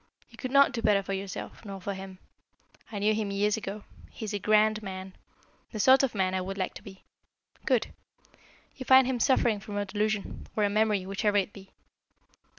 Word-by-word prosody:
You - - -17
could 255 - -4
not 280 +1 +5
do 240 -3 -4
better 205 -3 +3
for 195 - -4
yourself, 195 +3 -6
nor 195 -3 -7
for 200 +2 -4
him. 190 -1 -9 0.7
I 210 - -5
knew 210 +2 +2
him 215 -1 -2
years 205 +1 +1
ago. 205 -1 -6 0.3
He 220 - -8
is 210 - -5
a 205 - -1
grand 215 +1 +3
man 190 -2 -7 0.6
the 215 - -6
sort 260 +6 +6
of 265 -5 -1
man 190 -1 +1
I 185 - 0
would 195 +1 -5
like 185 - -2
to - - -10
be. 190 -1 -13 0.6
Good. - - +1 0.8
You 265 - -7
find 260 +1 +7
him 255 -1 -1
suffering 235 -4 +2
from 205 0 -7
a 205 - -1
delusion, 210 +1 -2
or 215 - +1
a 205 - +2
memory, 210 -2 +1
whichever 205 +2 0
it 200 0 0
be. 195 -1 -13
205 Hz, 205 wpm, -28 LUFS, 195-220 Hz, 0.8 s, find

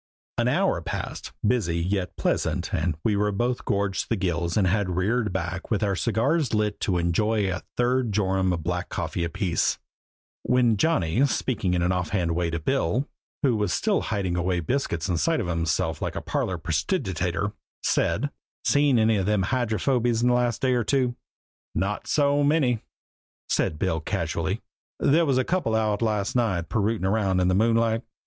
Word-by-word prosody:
An - - +2
hour - - +2
passed - - -5
busy, 105 -8 +1
yet 90 +1 -2
pleasant - - -1
and 80 -4 0
we 105 - +2
were 105 +1 +1
both 120 +5 -1
gorged 100 -1 0
to - - -10
the 115 - +2
gills 85 -3 -1
and 100 - +3
had 95 +1 +1
reared 105 +4 +1
back 90 0 -4
with 110 -2 0
our 100 -2 +1
cigars 115 - +1
lit 105 -1 0
to 90 -3 0
enjoy 100 +5 +1
a 90 - -4 0.2
third 125 -1 +1
jorum 95 -2 +1
of 85 -3 -2
black 90 +1 -2
coffee 85 - -3
apiece, 85 0 0 0.6
when 125 -3 +3
Johnny, 105 - +2
speaking 100 -9 -1
in 85 - +1
an 90 - +2
offhand 90 -1 0
way 85 -1 0
to 85 0 -2
Bill, 110 - 0 0.4
who 130 -5 +3
was 105 -4 0
still - - +1
hiding 95 -4 -1
away 90 0 0
biscuits 95 - -1
inside 100 - +1
of 110 - -1
himself 85 -2 -1
like - - -3
a - - -1
parlor - - -2
prestidigitator, - - -1 0.3
said: 145 +6 +1 0.3
"Seen 145 -3 +4
any 110 -1 +3
of 95 -1 -1
them 105 -2 +2
old - - -2
Hydrophobies 120 0 +1
the 125 0 +4
last 120 -1 0
day 130 -1 +3
or 120 -1 +1
two?" 125 +1 +1 0.6
"Not 100 +2 -2
so 145 -1 +2
many," 140 -6 +2 0.7
said 75 - 0
Bill 80 -1 0
casually. 80 - -2 0.4
"There 160 +3 +3
was 135 -2 +2
a 130 - +3
couple 170 -11 0
out 110 -1 +1
last 105 -2 0
night 100 -9 0
pirootin' 105 -3 0
round 95 -2 +1
in 90 0 +2
the - - +2
moonlight. 115 +2 +2
105 Hz, 175 wpm, -25 LUFS, 90-120 Hz, 0.7 s, Seen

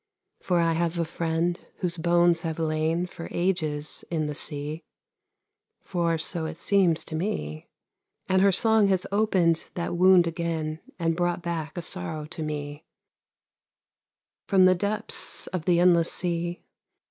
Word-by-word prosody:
For 180 - +1
I 165 -1 +2
have 170 +1 -1
a 170 - 0
friend 165 +1 -1
whose 180 -1 -2
bones 170 0 +3
have 160 -2 -3
lain 160 +2 0
For 170 -2 -8
ages 155 -5 -1
in 160 -3 -1
the 150 - -3
sea, 150 +2 -5 1.0
(For 170 -2 0
so 160 0 0
it 160 0 -7
seems 185 -5 +2
to 160 - -6
me), 80 - -3 0.6
And 190 0 +3
her 200 0 +5
song 220 +2 +4
has 190 -1 +1
opened 190 -6 +2
that 175 0 -2
wound 180 0 +6
again 165 -2 -3 0.2
And 165 -2 0
brought 175 0 -1
back 165 -2 -4
a 175 - -3
sorrow 150 - -4
to 160 +1 -7
me 145 0 -5 1.6
From 190 -2 +5
the 185 - +6
depths 205 +4 -2
of 180 -3 -5
the 175 -1 +3
endless 170 -2 +5
sea. 175 0 -1
170 Hz, 145 wpm, -26 LUFS, 160-180 Hz, 1.6 s, wound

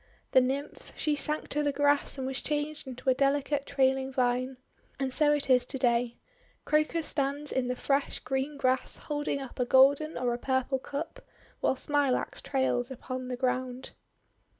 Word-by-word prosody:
The 260 - +6
Nymph, 270 +3 -3
she 300 -1 0
sank 300 +2 -2
to 295 - 0
the 290 -1 +1
grass 285 0 +2
and 265 - -3
was 260 -1 -3
changed 300 0 -3
into 255 0 -9
a - - +4
delicate 280 +1 0
trailing 265 -1 +1
vine. 255 0 0 0.4
And 265 -1 -1
so 300 0 +4
it 295 -1 +1
is 255 -2 +4
to 270 - -1
day. 240 -2 +1 0.5
Crocus 305 +1 +1
stands 285 +1 -1
in 255 -1 0
the 250 - -1
fresh, 275 +2 0
green 270 +2 -3
grass 255 -1 +1
holding 290 -1 -3
up 265 -2 -9
a 250 - +2
golden 280 +5 +4
or 245 -1 0
a 240 - -4
purple 260 +1 0
cup, 295 +5 -6 0.4
while - - +1
Smilax 285 -1 0
trails 260 -2 0
upon 255 0 -6
the 250 -1 -4
ground. 255 0 -2
270 Hz, 175 wpm, -29 LUFS, 255-290 Hz, 0.5 s, The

